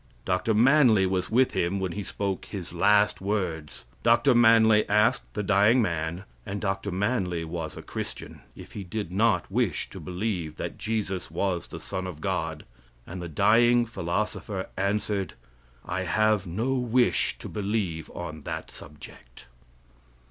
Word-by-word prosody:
Dr. 110 - +1
Manly 120 -4 +5
was 95 0 -1
with 125 +3 +3
him 90 +3 0
when 95 -2 -2
he 105 - -4
spoke 100 -1 -3
his 95 -4 -7
last 105 +4 +3
words. 90 - -3 0.2
Dr. 120 +3 +4
Manly 110 -2 +5
asked 105 - +2
the 105 - -1
dying 105 +5 +4
man, 85 -3 -1 0.2
and 100 +8 -5
Dr. 95 -1 -2
Manly 95 -4 -1
was 80 -1 -5
a - - -8
Christian, - - -6
if - - -12
he 100 - -6
did 95 0 -5
not 100 -2 +1
wish 105 -6 -1
to - - -8
believe 90 -4 -3
that - - -6
Jesus 105 -4 -2
was 95 -3 -2
the - - -8
Son 95 0 -4
of 85 -5 -8
God, 80 -3 -3 0.4
and 90 +1 -7
the 85 - -5
dying 120 +8 +4
philosopher 100 -1 -3
answered: 100 0 -1 0.5
"I 95 +1 -2
have 110 0 +2
no 110 +10 -1
wish 125 -1 +1
to - - -8
believe 100 -6 -2
on 80 -3 -6
that - - -6
subject." 75 -5 -13
100 Hz, 150 wpm, -26 LUFS, 90-110 Hz, 0.5 s, Manly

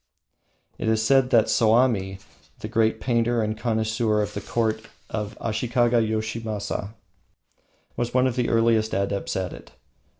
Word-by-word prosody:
It - - -2
is 110 0 +2
said 135 0 +4
that 115 -3 +5
Soami, 110 -4 +2 0.4
the - - -4
great 110 0 +1
painter 120 -1 +1
and 110 0 -2
connoisseur 110 -1 0
of 105 0 -5
the 105 - -4
court 110 0 -1 0.2
of 105 -1 -4
Ashikaga 120 +1 +1
Yoshimasa, 110 -1 -3 1.0
was 120 0 -2
one 130 +1 +3
of 130 -2 0
the 125 -2 0
earliest 115 -1 +2
adepts 100 0 -2
at 95 -2 -2
it. - - -13
110 Hz, 140 wpm, -24 LUFS, 110-120 Hz, 1.0 s, that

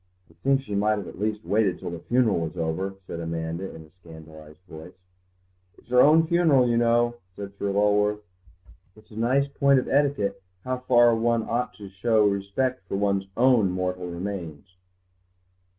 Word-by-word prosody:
"I - - -22
think 135 0 +2
she 105 - -7
might 105 +2 +1
at 100 -2 -8
least 105 0 -2
have - - -10
waited 100 -3 +2
till - - -6
the 85 - -6
funeral 115 0 +1
was 85 +2 -5
over," 85 +4 -3
said 85 - -7
Amanda 85 +2 -5
in 80 - -11
a 80 - -20
scandalised 80 -1 -14
voice. 80 +3 -11 0.8
"It's - - -23
her 125 0 +5
own 160 +4 +5
funeral, 160 -7 +3
you 120 - +1
know," 120 0 +2 0.2
said 100 -1 -8
Sir 100 - -1
Lulworth; 105 +1 +1 0.7
"it's 110 0 -21
a - - -13
nice 130 +5 +1
point 140 0 +2
in 130 - -1
etiquette 135 -9 0 0.2
how 130 0 -3
far 120 -2 +4
one 115 0 +1
ought 120 +3 -2
to 100 - -10
show 105 +3 +1
respect 100 +6 -1
to - - -3
one's 100 -1 0
own 120 -5 +4
mortal 90 0 -3
remains." 85 -2 -7
105 Hz, 175 wpm, -25 LUFS, 90-120 Hz, 0.8 s, her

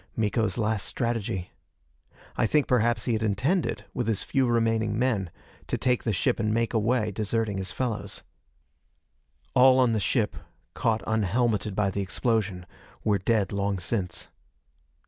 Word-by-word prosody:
Miko's 110 -2 0
last 110 -2 0
strategy. 115 -7 -2 0.8
I - - +2
think 150 +4 +3
perhaps 120 -1 +2
he 120 - +1
had 110 - 0
intended, 110 - 0
with 125 - -2
his 110 -3 0
few 135 -3 +1
remaining 115 -2 +1
men, 110 -7 0 0.4
to - - -1
take 125 -2 +1
the 115 - +1
ship 100 - 0
and 105 -1 +1
make 115 +2 0
away, 110 0 +1
deserting 105 0 -1
his 95 - -4
fellows. 115 -6 -3 1.3
All 130 0 +6
on 125 -3 +4
the 110 - +1
ship, 100 - 0 0.4
caught 110 -1 0
unhelmeted 110 -1 0
by 100 -1 +1
the 100 - -2
explosion, 100 -2 -1 0.4
were 105 -2 +2
dead 105 +1 +1
long 100 -1 -1
since. 90 -2 -3
110 Hz, 145 wpm, -27 LUFS, 100-120 Hz, 1.3 s, All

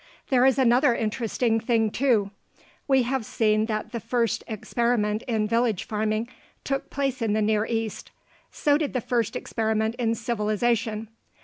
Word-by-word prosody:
There 255 -1 +5
is 265 -1 +3
another 250 0 +4
interesting 225 0 0
thing, 225 -1 +1
too. 225 -7 +1 0.6
We 265 -2 +4
have 260 0 -1
seen 215 0 +1
that 215 -2 -3
the 235 - -3
first 235 +1 -1
experiment 220 -1 0
in 220 -3 0
village 230 -3 +1
farming 215 +1 -1 0.4
took 275 0 -2
place 270 -2 -2
in 220 -2 +1
the 215 - +1
Near 215 +1 +1
East. 225 -2 -3 0.4
So 290 0 +2
did 300 -3 -2
the 255 - +1
first 230 -2 -1
experiment 220 0 -1
in 230 -1 +1
civilization. 225 -1 -1
230 Hz, 150 wpm, -25 LUFS, 215-245 Hz, 0.6 s, There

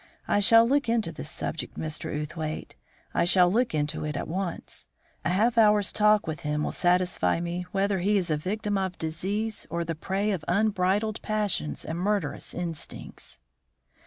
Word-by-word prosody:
I - - +2
shall 230 +3 +7
look 280 -2 +1
into 225 -7 +1
this 150 -1 -5
subject, 165 -1 -2
Mr. 155 -1 -1
Outhwaite; 155 0 -5 0.4
I - - +2
shall 180 0 +5
look 235 -3 +1
into 150 +1 -1
it 150 -1 -3
at - - -4
once. 180 +1 -3 0.4
A - - 0
half 225 +6 +2
hour's 210 -2 +4
talk 210 0 +4
with 160 0 -4
him 150 0 -2
will - - -1
satisfy 180 -1 +2
me 175 +1 -4
whether 195 0 +1
he 205 +3 +2
is 180 -4 0
a - - +3
victim 205 +5 -2
of 185 -1 -3
disease 200 +7 -2
or 170 0 -2
the 165 - -2
prey 195 +6 -1
of 180 -6 -2
unbridled 205 +2 +1
passions 210 -7 -1
and 165 +2 -4
murderous 205 +2 -1
instincts." 165 - -4
185 Hz, 170 wpm, -27 LUFS, 165-210 Hz, 0.4 s, shall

